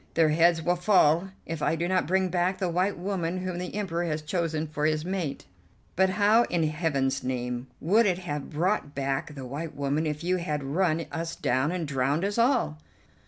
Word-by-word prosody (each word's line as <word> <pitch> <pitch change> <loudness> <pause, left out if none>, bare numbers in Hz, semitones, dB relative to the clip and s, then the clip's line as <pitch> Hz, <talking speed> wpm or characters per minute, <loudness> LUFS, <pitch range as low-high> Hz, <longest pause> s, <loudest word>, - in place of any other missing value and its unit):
Their 165 -2 +4
heads 165 +1 +3
will 175 +2 +1
fall 180 -2 +4 0.2
if 165 -2 -5
I - - +2
do 170 +2 -1
not 185 -3 +1
bring 190 +1 +2
back 180 +1 0
the 185 -3 -1
white 185 +4 0
woman 185 -1 -2
whom 180 -1 -3
the 180 +2 -5
Emperor 175 -4 -1
has 155 -2 -2
chosen 160 -1 -1
for 150 -1 -1
his 155 0 0
mate." 180 -6 -3 0.5
"But 190 +1 +4
how 210 +4 +4
in 170 -2 0
Heaven's 150 -4 0
name 125 0 -3
would 210 +7 +3
it 180 -2 +1
have 150 -6 -5
brought 165 -1 -1
back 140 +3 -2
the 135 -2 -7
white 145 +5 -5
woman 145 +3 0
if 150 +1 -3
you 180 +1 +1
had 150 -5 -2
run 160 +3 0
us 165 0 -4
down 130 +5 +1
and 175 -3 -2
drowned 140 +5 0
us 205 +3 -1
all?" 235 - +2
165 Hz, 200 wpm, -27 LUFS, 150-185 Hz, 0.5 s, Their